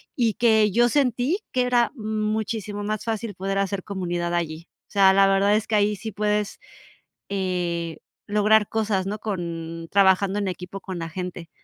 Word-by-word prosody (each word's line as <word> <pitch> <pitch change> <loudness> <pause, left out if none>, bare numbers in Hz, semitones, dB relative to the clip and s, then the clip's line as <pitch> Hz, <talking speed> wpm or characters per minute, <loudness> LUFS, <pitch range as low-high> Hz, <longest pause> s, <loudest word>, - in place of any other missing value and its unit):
y 230 -4 +2
que 220 -4 +4
yo 240 +3 +4
sentí 265 - +1
que 255 - +2
era 245 -1 +2
muchísimo 215 -2 -2
más 215 0 -2
fácil 220 -2 -3
poder 195 +1 -2
hacer 195 -1 -1
comunidad 175 -3 -3
allí. 165 0 -3 0.2
O - - -30
sea, 195 -2 +6
la 195 0 +5
verdad 195 +1 +3
es 215 - -1
que 220 - 0
ahí 210 0 +3
sí 220 +2 -6
puedes, 210 0 -1 0.7
eh, 175 -4 -2 0.3
lograr 210 0 +3
cosas, 210 -4 0
¿no? 210 +2 -3
con 165 -5 -5
trabajando 195 0 +4
en 200 - -1
equipo 180 +2 -6
con 185 -2 -6
la 165 - -4
gente. 180 -1 -6
200 Hz, 170 wpm, -24 LUFS, 185-215 Hz, 0.7 s, sea